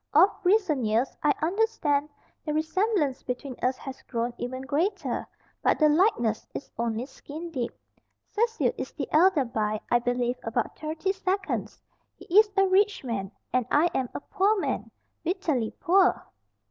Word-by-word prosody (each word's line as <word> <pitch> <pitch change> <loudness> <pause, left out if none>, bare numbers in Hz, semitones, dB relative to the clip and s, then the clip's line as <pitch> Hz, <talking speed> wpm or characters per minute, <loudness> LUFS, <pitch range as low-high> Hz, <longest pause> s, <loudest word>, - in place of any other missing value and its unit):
Of 360 +7 +7
recent 365 - +3
years, 225 +5 +1
I 295 - +4
understand, 325 -6 +1 0.3
the 300 -1 -2
resemblance 320 - +1
between 250 +1 -5
us 255 +1 +1
has 270 -1 -8
grown 235 0 -3
even 255 +2 -4
greater. 330 +9 -1 0.3
But - - +3
the 305 -1 +5
likeness 295 - +2
is - - -6
only 230 0 -1
skin 310 +5 -9
deep. 250 -6 -2 0.6
Cecil 455 +1 +1
is - - -5
the - - -4
elder 320 -3 +5
by, 215 -2 -1
I 240 - +5
believe, 245 0 0
about 225 - -2
thirty 320 +5 -2
seconds. 385 0 -2 0.3
He - - -14
is 435 -1 +5
a 390 - +6
rich 395 0 +3
man, 205 -6 -3 0.2
and 250 -2 +1
I 330 +4 +3
am 255 -2 -1
a - - -3
poor 410 +4 +1
man - - -2 0.3
bitterly 320 - 0
poor." 370 +2 +3
300 Hz, 155 wpm, -27 LUFS, 245-380 Hz, 0.6 s, Of